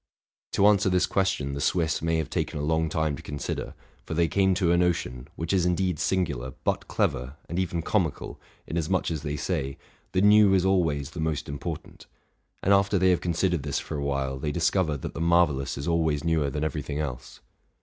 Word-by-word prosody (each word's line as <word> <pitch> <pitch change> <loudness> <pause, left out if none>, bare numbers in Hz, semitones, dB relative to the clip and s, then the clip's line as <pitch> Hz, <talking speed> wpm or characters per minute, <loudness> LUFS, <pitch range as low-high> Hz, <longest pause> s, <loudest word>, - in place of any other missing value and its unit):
To 100 - +3
answer 100 -2 +5
this 90 -1 +3
question, 95 -9 0
the 70 - -4
Swiss 80 -1 +1
may 80 0 +1
have 80 -3 -3
taken - - -2
a 75 - -3
long 80 +1 +1
time 80 -2 0
to - - -10
consider; 75 -1 -5 0.3
for 80 - -5
they 85 +1 +3
came 95 +1 +2
to 90 -2 +2
a - - +4
notion, 80 -8 0
which 85 +3 -2
is 95 -3 +3
indeed 90 -2 0
singular, 70 -9 -1
but - - -1
clever, 65 +3 -1
and 85 - -3
even 85 -3 -1
comical, 90 -8 -1 0.3
inasmuch 85 +2 -1
as 80 -3 -3
they 75 -1 -3
say, 70 -4 -2 0.4
the 95 - +2
new 105 -1 +6
is 95 -1 +2
always 80 -7 +1
the 85 - -8
most 80 -2 -2
important: 70 0 -6 0.6
and 100 - +4
after 100 +1 +3
they 95 0 +4
have 90 - +1
considered 85 -1 0
this 70 -1 -2
for - - -4
a 70 - -2
while, 70 -1 -2
they 75 +2 -2
discover 85 -1 +1
that - - -6
the - - -5
marvellous 85 -5 +2
is 70 - -4
always 80 -3 +1
newer 80 -4 +1
than 75 +3 -3
every 80 -1 -2
thing 70 +1 -5
else. 65 -5 -5
80 Hz, 205 wpm, -26 LUFS, 70-90 Hz, 0.6 s, new